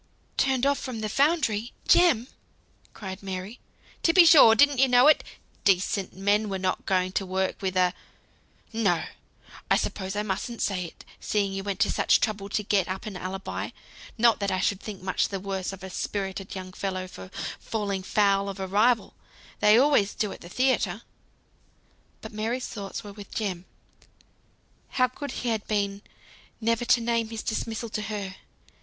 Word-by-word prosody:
"Turned 265 -1 +2
off 280 0 +2
from 245 -4 -5
the 215 - -1
foundry! 260 -5 +1
Jem?" 310 -10 +5 0.6
cried 190 -2 -8
Mary. 190 +3 -6 0.4
"To 330 - +3
be 360 -1 +8
sure! 285 -9 +8
didn't 285 +1 +4
you 270 - +6
know 250 0 +5
it? 300 0 +6 0.4
Decent 195 0 +1
men 205 +2 +1
were 195 - -2
not 185 -1 -2
going 185 -1 +1
to 195 - -1
work 190 0 -2
with 190 -1 -1
a 180 -1 +3 0.8
no! 200 -7 +1 0.7
I - - +5
suppose 190 0 -3
I 210 - 0
mustn't 215 +4 -3
say 185 -3 -1
it, 165 - -12
seeing 200 -2 0
you 195 0 -4
went 200 -1 -3
to - - +3
such - - +3
trouble 205 -3 -2
to 210 - -1
get 200 -3 +1
up 190 +4 -5
an 210 -3 -6
alibi; 185 +2 -4 0.5
not 230 -1 +4
that 200 -1 -1
I 185 - 0
should 195 +1 0
think 205 -4 -8
much 185 -1 +1
the 195 - -4
worse 190 -1 -3
of 195 -1 -10
a 190 - -6
spirited 195 0 -4
young 185 -1 -7
fellow 185 -1 -3
for 95 - -11 0.3
falling 200 -3 -3
foul 200 0 +2
of 195 0 -7
a 190 - -2
rival, 220 +5 +2 0.5
they 210 +1 +6
always 255 -7 +3
do 210 -4 -1
at - - -10
the 175 - -11
theatre." 230 -4 +1 1.2
But - - -9
Mary's 230 +4 -2
thoughts 200 0 -6
were 205 -1 -9
with 205 -1 -11
Jem. 185 -5 -3 1.3
How 255 -1 +4
good 285 +3 -7
he 245 - 0
had 220 -2 -2
been 200 -1 -1 0.6
never 230 +1 0
to 245 0 +4
name 230 -1 0
his 225 -1 -5
dismissal 225 +1 -3
to 215 - -3
her. 200 -3 -5
205 Hz, 175 wpm, -26 LUFS, 190-230 Hz, 1.3 s, be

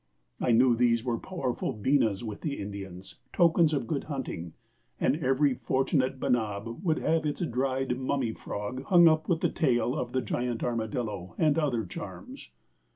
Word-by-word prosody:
I - - +1
knew 120 +1 +5
these 115 -1 +2
were 120 -2 -1
powerful 135 -10 -3
beenas 110 -2 +1
with 110 -3 -6
the 145 -3 -2
Indians, 95 -2 -7
tokens 170 -2 +4
of 145 - -1
good 150 -5 -2
hunting, 120 - -5 0.5
and 145 - +2
every 135 -1 +2
fortunate 130 +1 0
benab 115 +1 -1
would 165 -4 +1
have 160 0 +1
its 150 +2 -2
dried 130 -3 0
mummy 130 -3 -1
frog 105 +6 -5
hung 175 0 +7
up 155 -1 +2
with 165 -2 +1
the - - +2
tail 125 -5 +1
of - - -3
the 130 - 0
giant 120 -2 -2
armadillo 110 -6 -3
and 155 -3 +3
other 125 -8 0
charms. 85 - -9
130 Hz, 160 wpm, -28 LUFS, 115-145 Hz, 0.5 s, hung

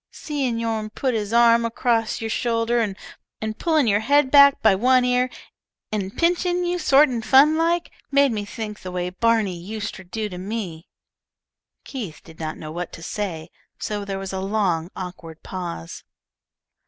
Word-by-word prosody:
"Seein' 275 -6 -3
yourn 225 -2 -2
put 255 +4 -1
his 210 -2 -2
arm 235 0 +5
across 230 -1 0
your 225 - -3
shoulder 235 0 +1
and 215 +1 -6
pullin' 315 -5 +2
your 205 -2 +3
head 275 +4 +3
back 280 -1 +7
by 220 -3 +6
one 250 +5 +3
ear 250 0 +2 0.6
and 200 -2 -3
pinchin' 355 +1 +1
you 355 +1 -1
sort 295 -2 +5
in 245 -4 -3
fun 275 +7 +5
like, 335 +2 +1 0.2
made 280 -1 +4
me 210 -2 -2
think 210 0 -6
the 185 - -7
way 180 0 -3
Barney 210 -3 +1
uster 205 -1 -5
do 210 +5 -4
to 180 -3 -8
me." 185 -5 -5 1.0
Keith 215 - -7
did 160 -1 -15
not 155 -1 -4
know 155 -1 -8
what 175 +2 -5
to 165 - -9
say, 170 -4 -4 0.3
so 205 -1 -3
there 195 -1 -4
was 195 0 -6
a 190 - -2
long, 190 -4 0
awkward 175 -3 -8
pause. 170 - -6
220 Hz, 165 wpm, -23 LUFS, 190-255 Hz, 1.0 s, back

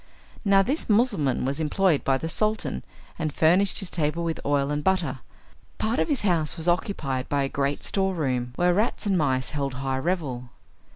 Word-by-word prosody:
Now 195 -2 +5
this 275 +6 -2
Mussulman 205 - +2
was 140 +3 -1
employed 160 +1 +2
by 135 -1 +2
the 160 - -4
Sultan, 215 +6 -1 0.4
and 155 -2 -1
furnished 180 +7 +3
his 195 -4 -2
table 160 +1 -1
with 165 -1 -2
oil 145 0 +1
and 150 0 -2
butter. 165 -8 +1 0.6
Part 225 +5 0
of - - +2
his 285 -4 0
house 170 -6 +1
was 165 +1 -1
occupied 150 -8 -1
by 140 -1 +1
a - - 0
great 140 +1 -2
storeroom, 145 -11 -1
where 175 0 +3
rats 215 +4 0
and 200 -2 +2
mice 130 -6 +1
held 140 -3 -2
high 135 0 -2
revel. 135 -7 -2
160 Hz, 180 wpm, -25 LUFS, 140-190 Hz, 0.6 s, Now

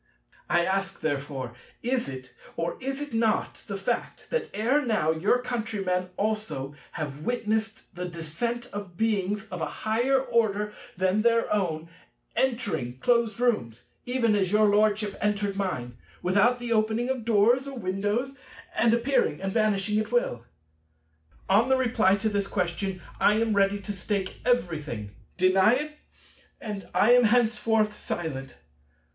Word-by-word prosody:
I 175 0 +3
ask 195 +1 -1
therefore, 140 -4 -3 0.3
is 245 - 0
it, 130 -1 -8 0.2
or 170 +1 -1
is 270 +1 -3
it 290 -3 -6
not, 225 -1 0
the 200 - -3
fact, 195 +5 -3
that 485 - -1
ere 245 +9 +2
now 215 -10 +2
your 165 +9 +2
countrymen 205 -7 -2
also 210 -10 -2 0.2
have 145 -2 -4
witnessed 220 +1 -2
the 180 0 -4
descent 175 +9 -3
of 200 -4 -7
Beings 210 -1 0
of 180 -2 -5
a - - 0 0.2
higher 240 +5 +3
order 210 -5 0 0.2
than 190 +3 +2
their 230 0 +2
own, 165 -6 -1 0.5
entering 230 - -1
closed 235 - +2
rooms, 125 - 0 0.2
even 245 -3 +2
as 190 -3 +1
your 210 0 +5
Lordship 210 0 +2
entered 205 -1 0
mine, 125 -12 -3 0.2
without 200 +7 +4
the 240 -1 -2
opening 220 +2 +1
of 260 -3 -2
doors 235 +4 +3
or 275 -1 -6
windows, 205 +7 -2 0.3
and 230 0 +3
appearing 235 - +1
and 195 0 -3
vanishing 210 -1 +2
at 215 +1 -3
will? 180 - 0 1.0
On 215 +6 +4
the 265 - +4
reply 225 -6 +3
to 205 +2 -1
this 200 -1 -1
question 185 0 -2 0.2
I 210 - +5
am 225 -1 +1
ready 200 0 +3
to 205 - -5
stake 195 0 -3
everything. 150 - -1 0.3
Deny 190 +4 +5
it, 300 +3 -2 0.7
and 205 -3 -6
I 225 - +4
am 245 -1 +6
henceforth 225 -2 +3
silent. 155 -9 -5
210 Hz, 145 wpm, -27 LUFS, 185-235 Hz, 1.0 s, am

